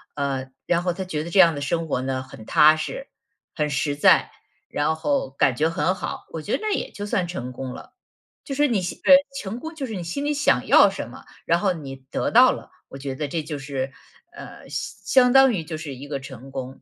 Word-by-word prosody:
呃， 135 -2 -2 0.2
然 175 0 +1
后 180 -1 -1
他 190 - -4
觉 155 -5 -3
得 170 - -7
这 180 - +2
样 170 -3 +7
的 145 - -5
生 165 +3 -1
活 130 - -1
呢 130 0 -2
很 125 -4 -12
踏 155 +1 +6
实、 - - -5 0.5
很 150 -2 -1
实 145 0 -1
在， 145 - +4 0.4
然 150 +2 0
后 150 -4 -1
感 135 -2 +1
觉 155 +4 +1
很 165 +2 0
好， - - -6
我 160 - -5
觉 200 - -4
得 - - -15
那 430 -1 0
也 - - -2
就 205 - -7
算 185 -3 0
成 145 -8 -5
功 130 0 -6
了。 - - -12 0.5
就 275 - -5
是 295 +1 +3
你 220 -7 0
心 180 - -5
对， 275 - +9 0.3
成 205 +5 -5
功 320 +4 -8
就 285 -4 -4
是 225 -4 -6
你 180 - -4
心 230 +13 -4
里 295 - +1
想 290 0 +2
要 - - +7
什 - - -6
么， - - -12 0.2
然 170 +1 +2
后 195 0 +2
你 135 -5 -8
得 - - -1
到 - - +7
了， - - -8 0.2
我 - - -10
觉 135 0 -5
得 145 +3 -3
这 155 +2 -3
就 150 -2 -5
是， 135 -1 -4 0.4
呃， - - -11
相 260 -1 +1
相 250 - +3
当 270 -2 +7
于 175 -6 -2
就 155 0 -6
是 155 -3 -6
一 135 +3 -9
个 140 -1 -3
成 135 -1 -10
功。 130 0 -7
155 Hz, 260 characters per minute, -23 LUFS, 135-190 Hz, 0.5 s, 对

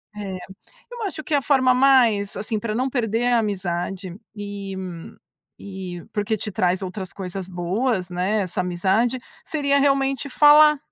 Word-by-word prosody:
É. 200 -2 -5 0.6
Eu 480 -2 -6
acho 335 -6 -4
que 310 - -4
a 285 - +3
forma 260 -2 +3
mais, 250 -6 +4
assim, 215 +1 -2
pra 215 0 -3
não 255 +3 0
perder 235 -1 0
a - - +5
amizade 185 -2 -3 0.2
e 200 -1 -6 0.8
e 185 -3 -7
porque 210 +1 -1
te 210 0 -5
traz 185 +1 +1
outras 185 0 -6
coisas 190 -1 -6
boas, 185 +2 -1
né, 190 +4 0
essa 185 0 -3
amizade, 190 +8 +1 0.3
seria 280 -2 +1
realmente 275 -1 +1
falar. 300 +2 +6
210 Hz, 150 wpm, -23 LUFS, 190-260 Hz, 0.8 s, falar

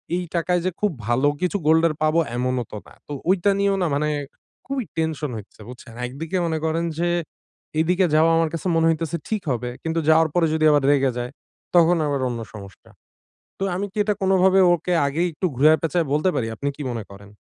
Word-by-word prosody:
এই 180 - -1
টাকায় 175 +1 +1
যে 185 - +1
খুব 210 -3 +1 0.2
ভালো 125 +4 +2
কিছু 180 +2 0
গোল্ডের 160 0 +4
পাবো 155 +1 +3 0.2
এমনও 125 0 -1
তো - - -6
না। - - -16
তো - - -10 0.2
ওইটা 195 +1 +3
নিয়েও 200 0 +2
না 175 - +2
মানে 150 +2 0 0.6
খুবই 270 -1 -2
টেনশন 155 -3 -2
হইচ্ছে 105 - -12
বুঝছেন। 125 -2 -11
একদিকে 160 +8 -4
মনে 160 -1 -1
করেন 165 +1 0
যে 175 0 +1 0.7
এইদিকে 180 +3 +2
যাওয়া 160 +1 +5
আমার 165 -1 +2
কাছে 165 +3 -3
মনে 165 0 +3
হইতেছে 165 +1 -1
ঠিক 215 -3 -1
হবে। 125 0 -2
কিন্তু 165 0 -1
যাওয়ার 160 0 +5
পরে 170 -2 +3
যদি 155 0 +2
আবার 145 -2 +3
রেগে 135 -2 +2
যায়, 125 +1 -4 0.4
তখন 175 0 +6
আবার 140 -1 -1
অন্য 120 -1 -4
সমস্যা। 100 +2 -12 0.7
তো - - -6
আমি 200 +2 -2
কি - - -33
এটা 210 0 +1
কোনভাবে 190 0 +4 0.2
ওকে 175 +2 -3
আগেই 160 +6 0
একটু 185 +5 -2
ঘুরায়ে-পেঁচায়ে 160 +3 +3
বলতে 150 +5 +2
পারি, 115 - -1
আপনি 140 - -2
কি 150 - -6
মনে 115 -3 -4
করেন? 100 0 -13
160 Hz, 200 wpm, -22 LUFS, 140-175 Hz, 0.7 s, তখন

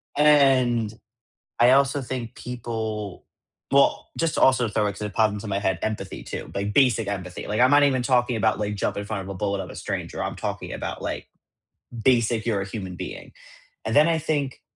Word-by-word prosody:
And 130 -7 +4 0.7
I 120 +1 +6
also 140 +1 +3
think 120 -2 -5
people, 110 -5 -5 0.5
well, 140 0 +3
just 165 -1 0
also 125 -3 +4
throw 105 0 0
it 100 - -1
'cause 100 - -12
it 105 -1 -5
popped 110 -2 +3
into 105 +1 -6
my 100 0 0
head, 95 -4 0
empathy 105 -3 -4
too, - - -7
like 100 +1 -2
basic 120 -6 +3
empathy. 90 -3 -5
Like 105 +2 -2
I'm 130 - +6
not 145 0 +6
even 130 -3 +2
talking 125 -1 +2
about 110 0 +1
like 105 0 -2
jump 100 - -2
in 100 - -4
front 105 -3 -3
of 95 - -8
a - - -4
bullet 100 0 -2
of - - -11
a - - -9
stranger. - - -4
I'm - - -3
talking - - -4
about - - -5
like - - -4 0.8
basic 115 -3 +3
you're 105 -4 0
a - - -3
human 95 -3 -6
being, - - -8 0.5
and 110 - -2
then 150 +5 +6
I 165 -1 +2
think 145 -4 -2
115 Hz, 205 wpm, -24 LUFS, 105-130 Hz, 0.8 s, I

